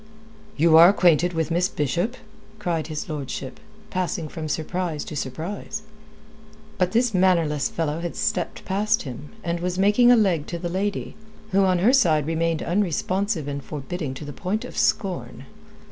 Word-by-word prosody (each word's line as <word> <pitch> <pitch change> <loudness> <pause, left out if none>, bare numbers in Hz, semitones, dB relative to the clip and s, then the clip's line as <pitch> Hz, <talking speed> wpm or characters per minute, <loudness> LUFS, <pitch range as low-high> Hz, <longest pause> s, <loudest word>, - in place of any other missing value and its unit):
"You 160 +1 +6
are 170 +2 +10
acquainted 175 -3 +3
with 165 0 -1
Miss 175 +3 +2
Bishop?" 175 - -1 0.4
cried 170 -7 -2
his 155 -2 -5
lordship, 140 -3 -5 0.3
passing 180 -3 -2
from 155 0 -5
surprise 160 0 -2
to - - -7
surprise. 175 +10 -5 1.0
But 180 -1 +2
this 235 0 +2
mannerless 170 -6 +2
fellow 160 -1 -2
had 170 0 -4
stepped 180 - -2
past 210 +3 +1
him, 140 +2 -8
and 170 0 -1
was 180 +1 -2
making 210 +5 +5
a - - +8
leg 185 -9 +2
to 170 - -4
the 175 0 -4
lady, 195 +3 -2 0.4
who 195 0 +4
on 185 -1 +3
her 210 +9 +4
side 160 - +4
remained 165 0 0
unresponsive 185 -1 0
and 140 -1 -4
forbidding 145 0 -5
to 150 - -8
the 145 - -7
point 195 +8 -3
of - - -10
scorn. 195 -5 -1
175 Hz, 160 wpm, -24 LUFS, 155-195 Hz, 1.0 s, are